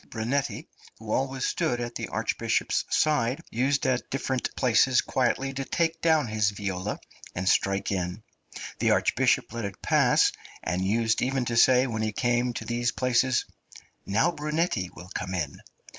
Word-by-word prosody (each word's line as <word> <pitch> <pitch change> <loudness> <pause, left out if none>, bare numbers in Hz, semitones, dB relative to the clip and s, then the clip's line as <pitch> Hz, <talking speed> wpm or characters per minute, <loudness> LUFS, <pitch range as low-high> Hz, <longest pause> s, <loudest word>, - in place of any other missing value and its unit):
Brunetti, 120 +5 -2 0.3
who 110 -1 -8
always 135 +1 -1
stood 120 - 0
at 120 0 -4
the - - -4
Archbishop's - - -1
side, 135 -4 +2
used 135 +4 +1
at 130 -2 0
difficult 130 -1 -2
places 125 +1 +4
quietly 135 +1 0
to 135 0 -3
take 165 +3 -1
down 160 -3 +3
his 110 -2 +1
viola 100 -1 -4 0.4
and 90 +1 -3
strike 95 +1 +2
in; 90 +2 -3 0.6
the - - +2
Archbishop - - +2
let 115 -1 -4
it 100 -2 -5
pass, - - +4 0.3
and 90 +3 -1
used 110 +3 +1
even 130 0 0
to 120 - -2
say 125 +2 +5
when 110 -4 -3
he 110 0 0
came 120 +1 +1
to 120 - -6
these 120 0 0
places, 125 0 +1 0.6
"now 115 - +2
Brunetti 150 - -1
will 90 +1 -11
come 95 0 -3
in." 75 -6 -4
120 Hz, 160 wpm, -27 LUFS, 105-135 Hz, 0.6 s, say